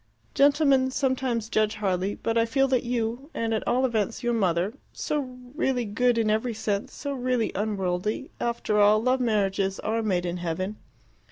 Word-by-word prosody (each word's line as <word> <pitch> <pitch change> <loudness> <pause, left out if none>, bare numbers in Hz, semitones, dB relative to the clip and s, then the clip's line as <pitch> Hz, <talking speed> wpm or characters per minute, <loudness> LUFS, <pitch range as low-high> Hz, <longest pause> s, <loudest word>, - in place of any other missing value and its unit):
"Gentlemen 280 -2 +4
sometimes 260 -4 -1
judge 215 -1 +1
hardly. 195 -1 -1
But 225 - -2
I 230 - +4
feel 270 +3 +2
that 255 -2 +2
you, 240 +3 -2
and 225 0 -1
at 220 - -1
all 255 +2 +2
events 225 -1 -1
your 240 0 +1
mother 185 -2 +1 0.2
so 265 -4 -3 0.2
really 265 -5 0
good 240 +3 +1
in 220 -2 +2
every 225 +2 0
sense, 210 -2 -2
so 285 -1 -5
really 250 -3 0
unworldly 200 -1 -2
after 235 -3 0
all, 210 +1 +6
love 255 +3 +2
marriages 195 -4 0
are 225 +1 -1
made 185 -5 0
in 175 0 -2
heaven." 180 +4 -3
225 Hz, 170 wpm, -26 LUFS, 205-255 Hz, 0.2 s, all